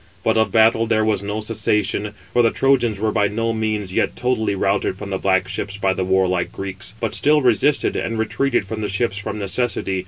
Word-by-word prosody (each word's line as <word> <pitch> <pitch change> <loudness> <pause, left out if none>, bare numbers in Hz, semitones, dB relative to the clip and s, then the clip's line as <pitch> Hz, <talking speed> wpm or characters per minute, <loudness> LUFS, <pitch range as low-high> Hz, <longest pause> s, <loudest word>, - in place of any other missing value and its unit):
But 110 - +2
of 110 -3 +2
battle 115 +1 +4
there 110 -1 +2
was 105 -3 +1
no 105 +2 -3
cessation: 105 -1 0 0.2
for 120 - +4
the 115 - +4
Trojans 120 -6 +1
were 110 +1 0
by 105 - +2
no 115 +2 -1
means 110 -4 -2
yet - - 0
totally 115 -5 0
routed 95 -1 0
from 100 0 -7
the 95 - -2
black 95 -1 +1
ships 100 +1 -4
by 95 -2 +1
the 95 - -2
warlike 95 -1 +1
Greeks, 95 +1 -7
but 115 -3 -2
still 150 0 +3
resisted, 130 +4 +2
and 115 - -2
retreated 120 +1 0
from 110 +2 -5
the 105 - -2
ships 100 0 -1
from 100 - -5
necessity. 100 -2 -1
105 Hz, 210 wpm, -20 LUFS, 100-115 Hz, 0.2 s, battle